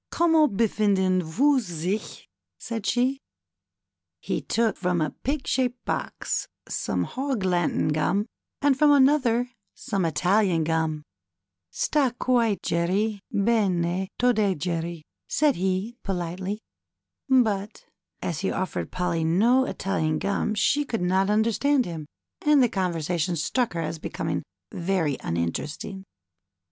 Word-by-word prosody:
Comment 320 Hz, -4 st, +3 dB
hefinden 195 Hz, -4 st, +2 dB
vous 260 Hz, -, +2 dB
sichf 180 Hz, -1 st, -4 dB, 0.3 s
said 225 Hz, -3 st, -5 dB
she. 255 Hz, +3 st, +1 dB, 1.0 s
He -, -, -2 dB
took 225 Hz, -2 st, +1 dB
from 180 Hz, -2 st, 0 dB
a 155 Hz, -1 st, 0 dB
pig 275 Hz, +1 st, -1 dB
shaped 250 Hz, -1 st, -1 dB
box -, -, -2 dB, 0.2 s
some -, -, -1 dB
Hog 265 Hz, -5 st, -2 dB
Latin 175 Hz, -4 st, +1 dB
gum, 155 Hz, +7 st, +1 dB, 0.4 s
and 285 Hz, -2 st, +4 dB
from 295 Hz, +2 st, +5 dB
another 260 Hz, -4 st, +4 dB, 0.2 s
some 195 Hz, -2 st, -2 dB
Italian 175 Hz, +3 st, +2 dB
gum, 160 Hz, -1 st, -1 dB, 0.7 s
Sta 270 Hz, -, +1 dB
guite 235 Hz, -5 st, +2 dB
gerry 195 Hz, +6 st, 0 dB
bene 190 Hz, -4 st, +1 dB
to 245 Hz, 0 st, +3 dB
day 205 Hz, -4 st, +1 dB
gerry^'' 165 Hz, 0 st, -3 dB, 0.3 s
said 295 Hz, -2 st, +2 dB
he, 190 Hz, +6 st, -1 dB
politely; 185 Hz, +2 st, -3 dB, 0.7 s
but 215 Hz, -5 st, +1 dB, 0.4 s
as 170 Hz, -, -2 dB
he 190 Hz, -, -1 dB
offered 185 Hz, -, -3 dB
Polly 180 Hz, -2 st, -1 dB
no 225 Hz, +11 st, +4 dB
Italian 160 Hz, -, -1 dB
gum 200 Hz, +4 st, -1 dB
she 290 Hz, +7 st, +2 dB
could 225 Hz, -9 st, -3 dB
not 190 Hz, +2 st, +2 dB
understand 230 Hz, +6 st, +2 dB
him, 160 Hz, -3 st, -6 dB, 0.4 s
and 295 Hz, -3 st, +5 dB
the 245 Hz, -, +3 dB
conversation 175 Hz, -2 st, -1 dB
struck 235 Hz, -, 0 dB
her 170 Hz, -, -2 dB
as 160 Hz, 0 st, -4 dB
becoming -, -, -3 dB, 0.3 s
very 170 Hz, -5 st, 0 dB
uninteresting. 145 Hz, -, -3 dB
195 Hz, 125 wpm, -25 LUFS, 170-245 Hz, 1.0 s, from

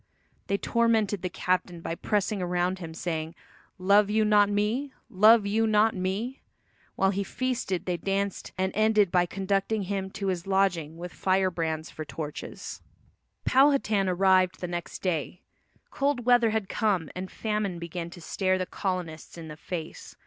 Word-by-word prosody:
They 200 Hz, -, +1 dB
tormented 220 Hz, -4 st, +1 dB
the 180 Hz, -, -2 dB
captain 180 Hz, -1 st, -1 dB
by 165 Hz, -, -4 dB
pressing 205 Hz, +3 st, -1 dB
around 180 Hz, +1 st, 0 dB
him 165 Hz, -3 st, -7 dB
saying, 165 Hz, -1 st, -3 dB, 0.4 s
"Love 200 Hz, +2 st, +4 dB
you 215 Hz, +1 st, +2 dB
not 205 Hz, -1 st, +5 dB
me? 220 Hz, +7 st, 0 dB, 0.2 s
Love 215 Hz, +2 st, +6 dB
you 220 Hz, +2 st, +2 dB
not 215 Hz, +1 st, +3 dB
me?" 195 Hz, +8 st, -3 dB, 0.5 s
While 195 Hz, 0 st, +3 dB
he 200 Hz, +1 st, -1 dB
feasted 235 Hz, -6 st, -2 dB
they 180 Hz, -1 st, -1 dB
danced, 195 Hz, +1 st, -2 dB
and 190 Hz, 0 st, 0 dB
ended 215 Hz, -3 st, +3 dB
by 180 Hz, -1 st, +3 dB
conducting 195 Hz, +3 st, -1 dB
him 190 Hz, 0 st, -3 dB
to 200 Hz, -, -4 dB
his 180 Hz, -1 st, -3 dB
lodging 180 Hz, -5 st, +1 dB
with 175 Hz, +1 st, -7 dB
fire 190 Hz, 0 st, +1 dB
brands 160 Hz, -2 st, -3 dB
for 155 Hz, -, -6 dB
torches. 150 Hz, 0 st, -7 dB, 0.6 s
Powhatan 260 Hz, -8 st, +3 dB
arrived 185 Hz, 0 st, +3 dB
the 180 Hz, -, -3 dB
next 175 Hz, -1 st, -5 dB
day. 180 Hz, 0 st, -2 dB, 0.5 s
Cold 275 Hz, -4 st, 0 dB
weather 245 Hz, -2 st, +5 dB
had 220 Hz, -2 st, -1 dB
come 190 Hz, -7 st, 0 dB
and 185 Hz, +1 st, -5 dB
famine 210 Hz, -4 st, -2 dB
began 170 Hz, 0 st, -5 dB
to 175 Hz, 0 st, -12 dB
stare 185 Hz, +3 st, 0 dB
the 185 Hz, -, -2 dB
colonists 180 Hz, -5 st, -4 dB
in 160 Hz, -1 st, -8 dB
the 150 Hz, -, -7 dB
face. 160 Hz, +1 st, -7 dB
190 Hz, 160 wpm, -27 LUFS, 175-210 Hz, 0.6 s, Love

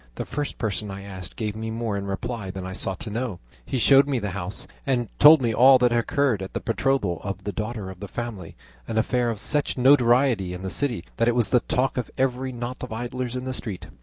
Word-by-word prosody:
The -, -, -4 dB
first 145 Hz, -1 st, -4 dB
person 105 Hz, -2 st, -2 dB
I 100 Hz, 0 st, -7 dB
asked 95 Hz, -3 st, -8 dB
gave 105 Hz, -2 st, -3 dB
me 110 Hz, 0 st, -4 dB
more 110 Hz, -2 st, -2 dB
in 100 Hz, 0 st, -3 dB
reply 110 Hz, 0 st, -4 dB
than 95 Hz, 0 st, -6 dB
I 95 Hz, -, -5 dB
sought 95 Hz, 0 st, -3 dB
to 110 Hz, -, -5 dB
know; 115 Hz, -4 st, -3 dB, 0.2 s
he 130 Hz, -, -3 dB
showed 135 Hz, +3 st, +6 dB
me 140 Hz, -2 st, 0 dB
the 105 Hz, -4 st, -3 dB
house, 90 Hz, +1 st, -3 dB, 0.2 s
and 120 Hz, -5 st, 0 dB
told 150 Hz, -1 st, +9 dB
me 115 Hz, -1 st, +1 dB
all 130 Hz, +4 st, +7 dB
that 125 Hz, -1 st, +3 dB
had 120 Hz, -, +3 dB
occurred 125 Hz, -3 st, +1 dB
at 95 Hz, -, -6 dB
the -, -, -2 dB
betrothal 115 Hz, -, 0 dB
of 95 Hz, -1 st, -5 dB
the 100 Hz, -, -3 dB
daughter 105 Hz, -1 st, -4 dB
of 90 Hz, -, -12 dB
the 100 Hz, -, -6 dB
family, 105 Hz, -6 st, -6 dB, 0.3 s
an 110 Hz, -, -3 dB
affair 120 Hz, +2 st, +1 dB
of 110 Hz, -3 st, -3 dB
such 145 Hz, +5 st, 0 dB
notoriety 125 Hz, -6 st, +4 dB
in 90 Hz, -, -8 dB
the 95 Hz, -, -3 dB
city 120 Hz, -11 st, -1 dB
that 115 Hz, -, +2 dB
it 120 Hz, -, +3 dB
was 120 Hz, -3 st, +2 dB
the 125 Hz, -, +4 dB
talk 130 Hz, +3 st, -1 dB
of 125 Hz, -, -2 dB
every 130 Hz, 0 st, 0 dB
knot 120 Hz, +1 st, -5 dB
of 125 Hz, -, -6 dB
idlers 120 Hz, +2 st, -4 dB
in 125 Hz, -, -3 dB
the 130 Hz, 0 st, -3 dB
street. 105 Hz, -7 st, -6 dB
115 Hz, 245 wpm, -25 LUFS, 100-125 Hz, 0.3 s, told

